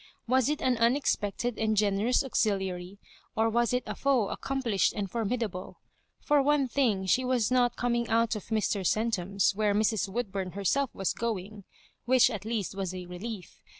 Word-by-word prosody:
Was 260 +2 +3
it 300 - -2
an 255 -2 +2
unexpected 235 -2 0
and 220 -1 +1
generous 210 +6 +2
auxiliary, 190 -6 -1 0.4
or 225 +1 +2
was 235 0 +2
it 250 0 0
a - - -4
foe 260 -7 +1
accomplished 250 -8 0
and 205 -2 -2
formi 230 +1 -1
dable? 185 -5 -5 0.5
For 295 -1 +3
one 285 -1 +2
thing, 230 -7 +1
she 255 +7 +2
was 250 -3 +1
not 245 -1 +3
coming 240 -1 -1
out 230 0 +2
of 210 - -7
Mr. 215 -3 0
Centum's, 200 -2 +1
where 205 0 +1
Mrs. 215 -1 +1
Woodbum 195 -4 -3
herself 245 +8 +1
was 195 - -1
going, 210 -3 -4 0.4
which 255 0 +5
at 210 -2 -6
least 220 -4 -2
was 190 -2 -4
a 180 -1 -6
relief. 180 +2 -8
220 Hz, 170 wpm, -29 LUFS, 195-245 Hz, 0.5 s, which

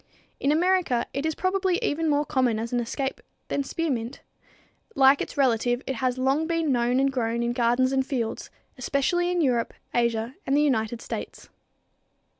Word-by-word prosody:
In 280 - +1
America 340 -7 +2
it 280 +3 -1
is 315 - -2
probably 375 -1 +1
even 320 +2 0
more 295 0 +2
common 255 -6 +1
as 230 +2 -4
an 245 - +2
escape 265 +3 -3 0.3
than 280 - 0
spearmint. 270 -6 -3 0.7
Like 270 +1 +5
its - - -5
relative, 245 -2 +2
it 265 - -3
has 255 0 0
long 270 +5 +1
been 330 -3 0
known 245 0 +2
and 270 0 +2
grown 235 -2 -1
in 235 0 0
gardens 245 +2 +2
and 265 -1 +2
fields, 245 -4 -3 0.3
especially 350 +7 0
in 355 -1 +1
Europe, 245 -6 0 0.2
Asia 235 0 0
and 275 +1 +2
the 295 - +4
United 235 -4 0
States. - - -7
265 Hz, 170 wpm, -25 LUFS, 240-295 Hz, 0.7 s, Like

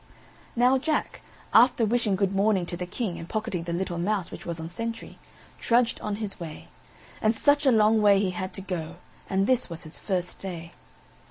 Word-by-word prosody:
Now 250 +2 +4
Jack, 310 +3 -1 0.3
after 235 0 +6
wishing 220 -2 +1
good 195 0 0
morning 195 -2 +2
to 175 - -4
the 180 0 -5
King 185 -1 -3
and 165 - -9
pocketing 195 -6 -2
the 170 - -3
little 175 0 -2
mouse 195 0 -1
which - - -9
was 170 -1 -3
on 160 - -5
sentry, 230 +6 -6 0.4
trudged 235 0 +2
on 210 -1 -2
his 210 -2 -5
way; 160 -3 -8 0.5
and 220 +1 +3
such 285 +4 +3
a - - +7
long 220 -1 +4
way 205 -1 +6
he 195 -2 +1
had 185 +1 -4
to 195 - -5
go 175 -3 -5 0.3
and 195 0 +2
this 255 -1 +1
was 170 +1 -7
his 155 -1 -9
first 180 -3 -3
day. 170 -3 -7
195 Hz, 195 wpm, -26 LUFS, 175-225 Hz, 0.5 s, a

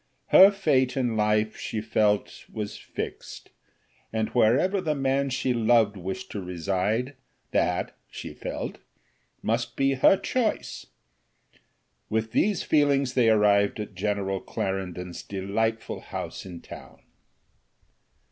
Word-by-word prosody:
Her 190 +1 +9
fate 145 -11 +1
in 120 -4 0
life, 105 0 +1
she 110 - -4
felt, 105 -1 0
was 105 -1 -5
fixed, - - -7 0.6
and 110 -1 -1
wherever 135 - +3
the 155 -4 -1
man 135 0 +1
she 130 0 0
loved 115 -2 +3
wished 95 0 -6
to 100 - -4
reside, 95 - -1 0.4
that, - - 0
she - - -8
felt, - - -5 0.6
must 120 +1 -1
be 135 0 +2
her 135 +8 +5
choice. 240 0 -2 1.2
With 110 0 -1
these 205 - +1
feelings 140 -3 +2
they 125 -3 +4
arrived 105 -1 +3
at 105 -1 -5
General 95 0 -1
Clarendon's 90 -3 -4
delightful 110 +4 -2
house - - -6
in 85 -2 -9
town. - - -12
110 Hz, 120 wpm, -26 LUFS, 100-130 Hz, 1.2 s, Her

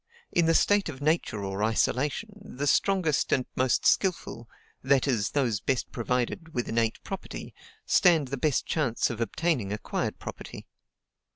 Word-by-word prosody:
In 170 -2 +2
the 165 - +4
state 205 -3 +3
of 135 -4 -7
Nature 145 -8 0
or 95 +1 -3
isolation, 135 - 0
the 145 -8 -5
strongest 170 0 +2
and 130 - +2
most 130 -1 +1
skilful 165 - +1 0.3
(that 135 +1 +2
is, 115 -7 +1
those 125 -8 0
best 130 +4 -1
provided 125 +7 -2
with 120 - -1
innate 115 -1 0
property) 195 -1 -7 0.3
stand 165 -7 +4
the 140 - -2
best 145 +1 +1
chance 130 -9 0
of 115 0 -5
obtaining 125 - -1
acquired 105 - -3
property. - - -9
135 Hz, 150 wpm, -27 LUFS, 115-165 Hz, 0.3 s, the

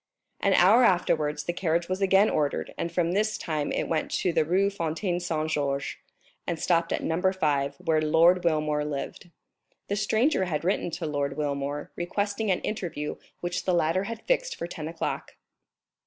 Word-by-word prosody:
An 195 -1 +3
hour 205 +8 +6
afterwards 155 -7 +2
the 175 - -2
carriage 170 -1 0
was 185 +1 -2
again 195 +2 +5
ordered, 145 -7 -1
and 170 - -2 0.3
this 215 +1 +1
time 155 -3 -2
it - - -1
went 160 -2 -1
to 180 - 0
the 160 -1 +3
Rue 190 +5 +2
Fontaine 175 0 -2
Saint 160 -3 -2
Georges, 140 -2 -1 0.5
and 170 - -1
stopped 170 -1 +1
at - - -1
No. 165 +2 -1
5, 145 -7 0
where 165 -4 +1
Lord 165 +4 +4
Wilmore 155 -3 +1
lived. 150 +4 -5 0.6
The 200 - +1
stranger 215 +2 +2
had 155 -4 -2
written 180 0 0
to 165 0 -4
Lord 145 -2 -2
Wilmore, 145 0 -3
requesting 205 +4 -2
an 185 - +1
interview, 165 -8 -4 0.2
which 175 0 -3
the 185 - +2
latter 170 +3 +1
had 230 +1 -6
fixed - - 0
for - - -4
ten 160 -3 -6
o'clock. 165 0 -4
170 Hz, 170 wpm, -27 LUFS, 155-190 Hz, 0.6 s, hour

